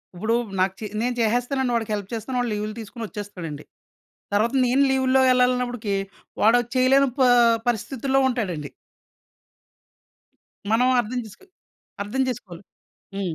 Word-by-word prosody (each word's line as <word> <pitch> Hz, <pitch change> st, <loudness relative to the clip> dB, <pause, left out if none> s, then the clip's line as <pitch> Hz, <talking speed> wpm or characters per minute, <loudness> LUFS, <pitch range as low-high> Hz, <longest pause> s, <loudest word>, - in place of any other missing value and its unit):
ఉప్పుడూ 220 Hz, +6 st, 0 dB, 0.2 s
నాకు 190 Hz, 0 st, +2 dB
చే 220 Hz, -, -5 dB, 0.2 s
నేను 245 Hz, +1 st, -1 dB
చేసేస్తానండి. 245 Hz, +3 st, 0 dB
వాడికి 225 Hz, -2 st, -2 dB
హెల్ప్ 200 Hz, -2 st, -6 dB
చేస్తాను. 240 Hz, +3 st, -4 dB
వాడు 245 Hz, -1 st, -1 dB
లీవులు 210 Hz, +1 st, -3 dB
తీసుకొనొచేస్తాడండి. 205 Hz, -, -7 dB, 0.7 s
తర్వాత 220 Hz, +4 st, +2 dB
నేను 255 Hz, +3 st, +3 dB
లీవుల్లో 265 Hz, 0 st, +3 dB
వెళ్ళాలన్నప్పుడికీ 250 Hz, -4 st, +1 dB, 0.5 s
వాడో 225 Hz, +3 st, +5 dB, 0.2 s
చెయ్యలేని 265 Hz, +2 st, +4 dB
ప -, -, +3 dB, 0.5 s
పరిస్థితుల్లో 265 Hz, +4 st, -1 dB
ఉంటాడండి. 180 Hz, -, -3 dB, 2.0 s
మనం 240 Hz, +3 st, +3 dB
అర్థం 245 Hz, +2 st, -2 dB
చేసుకో 220 Hz, -, -15 dB, 0.6 s
అర్థం 215 Hz, +6 st, -2 dB
చేసుకోవాలి. 195 Hz, -7 st, -6 dB, 0.5 s
హ్మ్. 190 Hz, -4 st, -3 dB
230 Hz, 115 wpm, -23 LUFS, 205-255 Hz, 2.0 s, వాడో